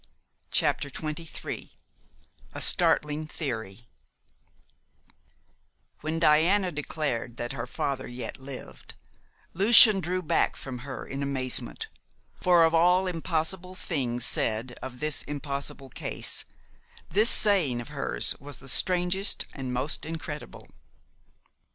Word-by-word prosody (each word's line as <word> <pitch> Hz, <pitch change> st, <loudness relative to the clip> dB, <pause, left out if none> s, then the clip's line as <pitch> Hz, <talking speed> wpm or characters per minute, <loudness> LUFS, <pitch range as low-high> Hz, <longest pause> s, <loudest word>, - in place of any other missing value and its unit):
CHAPTER 140 Hz, -, +1 dB
XXIII 155 Hz, +3 st, -6 dB, 0.8 s
A -, -, -6 dB
STARTLING 150 Hz, +1 st, +2 dB
THEORY 115 Hz, -, -6 dB, 2.1 s
When 155 Hz, +2 st, -3 dB
Diana 170 Hz, +5 st, +3 dB
declared 140 Hz, -6 st, -4 dB
that 120 Hz, +2 st, -4 dB
her 125 Hz, -2 st, -5 dB
father 130 Hz, +1 st, -3 dB
yet 120 Hz, 0 st, -7 dB
lived, 135 Hz, -1 st, -10 dB, 0.6 s
Lucian 210 Hz, +2 st, +8 dB
drew 185 Hz, +1 st, -2 dB
back 155 Hz, -, +1 dB
from 130 Hz, -2 st, -8 dB
her 135 Hz, +2 st, -7 dB
in 135 Hz, +1 st, -6 dB
amazement, 130 Hz, -2 st, -1 dB, 0.5 s
for 175 Hz, -2 st, +5 dB
of 165 Hz, -, +1 dB
all 180 Hz, +3 st, +4 dB
impossible 180 Hz, +1 st, -2 dB
things 125 Hz, -10 st, -2 dB
said 115 Hz, +3 st, +1 dB
of 125 Hz, -1 st, -8 dB
this 155 Hz, -1 st, -1 dB
impossible 140 Hz, -1 st, -5 dB
case -, -, -2 dB, 0.7 s
this 215 Hz, +7 st, +5 dB
saying 180 Hz, -, +4 dB
of 120 Hz, -, -8 dB
hers -, -, +1 dB
was 145 Hz, 0 st, -7 dB
the 135 Hz, -, -14 dB
strangest 180 Hz, +6 st, +2 dB
and 130 Hz, -3 st, -5 dB
most 130 Hz, +4 st, -2 dB
incredible. 160 Hz, -2 st, -8 dB
150 Hz, 110 wpm, -27 LUFS, 130-175 Hz, 2.1 s, Lucian